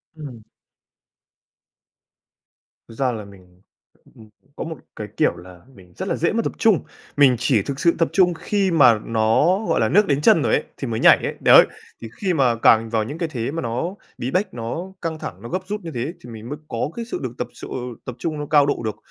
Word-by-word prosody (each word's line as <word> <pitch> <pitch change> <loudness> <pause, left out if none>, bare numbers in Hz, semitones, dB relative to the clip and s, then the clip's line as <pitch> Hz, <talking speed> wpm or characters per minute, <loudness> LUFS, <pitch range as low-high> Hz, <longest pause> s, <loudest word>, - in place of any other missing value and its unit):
Ừm. 130 -8 -10 2.5
Thực 115 - -12
ra 130 -1 0
là 110 -3 -6
mình, 90 -2 -18 0.5
ưm, 110 -1 -16 0.3
có - - -5
một 160 -3 -6 0.2
cái, 105 - -6
kiểu, - - +2
là 90 0 -13
mình 90 -2 -18
rất - - -4
là - - 0
dễ 170 - 0
mất 230 - +1
tập - - -2
trung, 215 -8 +3 0.3
mình 135 -4 +6
chỉ 120 -4 +2
thực 135 +6 -5
sự 170 -1 +3
tập 165 - +2
trung 180 -2 +4
khi 195 +2 -1
mà 125 -9 +5
nó, 115 - +2
gọi - - +1
là, - - +2
nước 205 +1 +4
đến 140 +1 +1
chân 155 - +5
rồi - - +1
ấy, - - +2
thì 135 - -4
mới 110 -1 -2
nhảy - - +7
ấy, - - -3
đấy. - - +8 0.4
Thì 115 - -7
khi 185 -3 +1
mà 130 -6 +2
càng 115 0 +4
vào 110 -1 0
những 145 +9 -6
cái 165 -2 -2
thế 120 -1 -3
mà 165 - -3
nó 125 - -3 0.2
bí 125 +3 -4
bách, 195 +3 -1
nó 160 +11 -5
căng 160 -1 -4
thẳng, 95 - -7
nó 115 - -8
gấp 185 - -2
rút 210 0 -4
như 165 -2 -7
thế 130 +8 -3
thì 120 - -11
mình 115 +1 -9
mới 145 - -5
có 115 +5 -2
cái 235 -1 -5
sự 245 - -5
được 120 -2 -4
tập - - -3
chô - - -10 0.4
tập 125 - -6
trung 155 -3 -3
nó 145 - -4
cao 145 -2 +5
độ 145 - -1
được, 110 - -2
135 Hz, 230 wpm, -21 LUFS, 115-165 Hz, 2.5 s, đấy